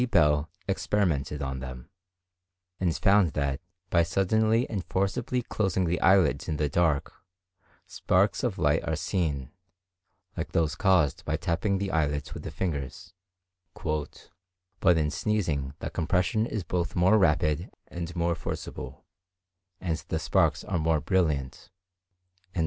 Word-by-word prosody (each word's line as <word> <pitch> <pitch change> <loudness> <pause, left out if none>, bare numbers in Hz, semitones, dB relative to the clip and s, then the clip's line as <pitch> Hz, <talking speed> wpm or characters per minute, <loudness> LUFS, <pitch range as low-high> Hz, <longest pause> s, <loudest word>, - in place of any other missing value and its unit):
Bell 75 -5 +3 0.2
experimented 80 -8 0
on 65 -1 -3
them, 65 -1 -8 0.9
and 85 -3 0
found 100 -5 +4
that 70 -2 -1 0.3
by 85 - +5
suddenly 110 +7 +2
and 100 -5 -3
forcibly 105 +7 -1
closing 95 -5 0
the 85 +1 -1
eyelids 95 -3 +4
in 75 - -1
the 75 0 +1
dark, 75 -1 +1 0.7
sparks - - +1
of - - -1
light - - +2
are - - -1
seen, 75 -8 -2 0.8
like - - -5
those 80 -2 +2
caused 90 - +2
by 80 0 -1
tapping 90 +3 0
the 95 0 -2
eyelids 75 -2 -1
with - - -7
the - - -6
fingers; 90 +2 -4 0.6
"but 90 +4 -3
in 75 -2 +1
sneezing 75 -11 -1
the - - -5
compression 90 +6 +1
is 110 -5 -3
both 90 0 -2
more 95 +5 +5
rapid 75 -4 +2 0.2
and 85 0 -6
more 85 0 +1
forcible, 80 -5 -6 0.7
and 85 -4 -1
the 80 - -1
sparks 80 -2 +1
are 85 - -1
more 80 0 +2
brilliant." 75 -5 -1
85 Hz, 130 wpm, -28 LUFS, 75-95 Hz, 0.9 s, by